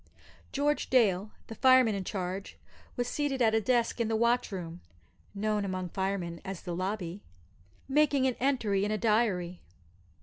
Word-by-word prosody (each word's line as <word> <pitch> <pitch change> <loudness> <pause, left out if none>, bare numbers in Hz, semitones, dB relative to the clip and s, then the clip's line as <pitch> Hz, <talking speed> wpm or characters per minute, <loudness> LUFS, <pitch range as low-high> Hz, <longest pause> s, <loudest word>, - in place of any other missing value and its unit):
George 290 +1 0
Dale, 210 -6 +3 0.2
the - - -8
fireman 255 -1 +5
in 195 -1 -3
charge, 190 0 -5 0.4
was 245 -1 -1
seated 285 0 -1
at 225 -3 +3
a 220 - +3
desk 235 +2 +1
in 230 - +1
the 225 - 0
watch 235 +1 +2
room 175 -2 -6 0.5
(known 210 0 0
among 185 -2 -3
firemen 190 -2 -3
as 190 -2 -6
the 175 -2 -4
"lobby"), 185 0 -3 0.7
making 280 -1 +3
an 260 - +2
entry 235 -7 +1
in 205 - 0
a 215 - 0
diary. 200 -5 0
210 Hz, 160 wpm, -30 LUFS, 190-245 Hz, 0.7 s, fireman